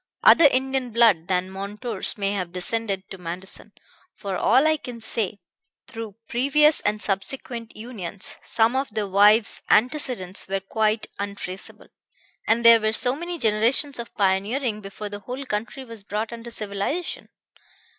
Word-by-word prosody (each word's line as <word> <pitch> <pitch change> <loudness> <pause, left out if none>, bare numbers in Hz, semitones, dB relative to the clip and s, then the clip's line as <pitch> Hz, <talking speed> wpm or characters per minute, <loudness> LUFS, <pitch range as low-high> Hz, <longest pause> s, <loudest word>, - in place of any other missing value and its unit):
Other 330 - +8
Indian 265 -1 0
blood 220 -8 +4
than 185 0 0
Montour's 205 +7 -4
may 200 -1 0
have 185 -4 -3
descended 195 +1 -2
to 195 - -8
Manderson, 180 +4 -6 0.4
for 200 -3 -4
all 255 +10 +4
I 315 0 +3
can 245 -4 -8
say, 220 -2 -2 0.5
through 225 -3 -7
previous 290 +5 +3
and 210 +1 -1
subsequent 230 +4 -3
unions; 210 -5 -4
some 230 +2 +2
of 270 +1 -1
the 210 -1 -2
wives' 205 +3 +4
antecedents 240 -7 +1
were 195 +1 -1
quite 215 +2 0
untraceable, 200 -2 -5 0.6
and 230 +1 +2
there 230 -1 +9
were 215 0 +1
so 250 +3 +3
many 345 +3 -5
generations 235 +3 +2
of 235 - -6
pioneering 210 +4 0
before 205 +1 -7
the 205 0 -7
whole 250 +7 -6
country 230 +4 -4
was 230 -4 -9
brought 215 +3 -3
under 235 0 -8
civilization. 215 - -4
220 Hz, 145 wpm, -24 LUFS, 200-245 Hz, 0.6 s, there